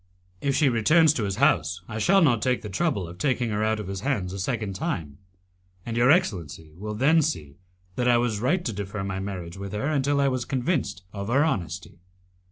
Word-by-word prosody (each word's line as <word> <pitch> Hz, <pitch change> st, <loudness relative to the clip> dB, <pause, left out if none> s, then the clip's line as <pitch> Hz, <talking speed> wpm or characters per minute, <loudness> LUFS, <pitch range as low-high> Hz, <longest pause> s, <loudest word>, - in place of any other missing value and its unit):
"If 140 Hz, -1 st, 0 dB
she 150 Hz, -, +4 dB
returns 150 Hz, +7 st, +4 dB
to 115 Hz, -7 st, -1 dB
his 100 Hz, -1 st, -2 dB
house 85 Hz, 0 st, +2 dB
I 110 Hz, -, -5 dB
shall 195 Hz, -, +4 dB
not 120 Hz, -8 st, +3 dB
take 125 Hz, +1 st, 0 dB
the 105 Hz, -, -5 dB
trouble 100 Hz, -, 0 dB
of 85 Hz, +1 st, -11 dB
taking 125 Hz, -5 st, 0 dB
her 105 Hz, +1 st, 0 dB
out 110 Hz, 0 st, +1 dB
of 105 Hz, -, -5 dB
his 95 Hz, 0 st, -4 dB
hands 100 Hz, -9 st, -1 dB
a 100 Hz, -, -5 dB
second 105 Hz, -1 st, -2 dB
time, 80 Hz, -6 st, -4 dB, 0.7 s
and 115 Hz, -, -4 dB
your 120 Hz, +2 st, +4 dB
excellency 85 Hz, -, +1 dB
will 105 Hz, +4 st, -5 dB
then 150 Hz, +8 st, +4 dB
see 75 Hz, -, -3 dB, 0.4 s
that 125 Hz, -, +1 dB
I 120 Hz, -1 st, +5 dB
was 120 Hz, -3 st, 0 dB
right 175 Hz, -, 0 dB
to 115 Hz, -, -1 dB
defer 100 Hz, 0 st, -4 dB
my 95 Hz, -1 st, -3 dB
marriage 95 Hz, -3 st, -6 dB
with 100 Hz, 0 st, -6 dB
her 105 Hz, +5 st, -2 dB
until 140 Hz, -1 st, +1 dB
I 140 Hz, -, +3 dB
was 130 Hz, -2 st, 0 dB
convinced 130 Hz, -, -2 dB
of 100 Hz, -1 st, -5 dB
her 135 Hz, +6 st, +3 dB
honesty." 90 Hz, -, -3 dB
110 Hz, 215 wpm, -25 LUFS, 95-135 Hz, 0.7 s, I